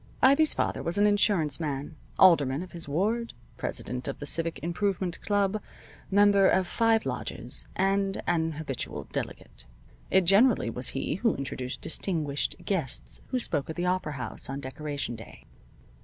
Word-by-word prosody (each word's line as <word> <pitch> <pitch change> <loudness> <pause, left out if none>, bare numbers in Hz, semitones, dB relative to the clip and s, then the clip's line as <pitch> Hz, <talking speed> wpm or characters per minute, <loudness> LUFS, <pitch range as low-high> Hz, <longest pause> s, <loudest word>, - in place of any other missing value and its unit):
Ivy's 280 +4 +5
father - - -1
was 170 +3 -1
an 205 - +4
insurance 195 -8 +3
man, 145 -1 -4 0.2
alderman 150 -5 +5
of 185 - -11
his 170 -4 -5
ward, 220 +10 0 0.2
president 125 +1 -3
of 140 - -3
the 145 - -7
Civic 165 +2 +3
Improvement 180 0 -1
club, 205 0 +1 0.5
member 200 -1 +5
of 190 0 +3
five 225 +4 +2
lodges, - - -5
and 195 +1 +1
an 165 -2 +1
habitual 145 -4 -4
delegate. - - -6 0.4
It 190 - +5
generally 195 - +4
was 125 +2 -1
he 145 - -1
who 230 +1 +1
introduced 130 -2 -4
distinguished 155 -6 -1
guests 165 -11 -3
who 260 - -1
spoke 145 - -1
at 160 - -4
the 175 - -2
opera 180 -4 0
house 130 -4 -5
on 135 +1 -3
Decoration 140 -1 -4
Day. 110 - -12
170 Hz, 155 wpm, -28 LUFS, 145-200 Hz, 0.5 s, Ivy's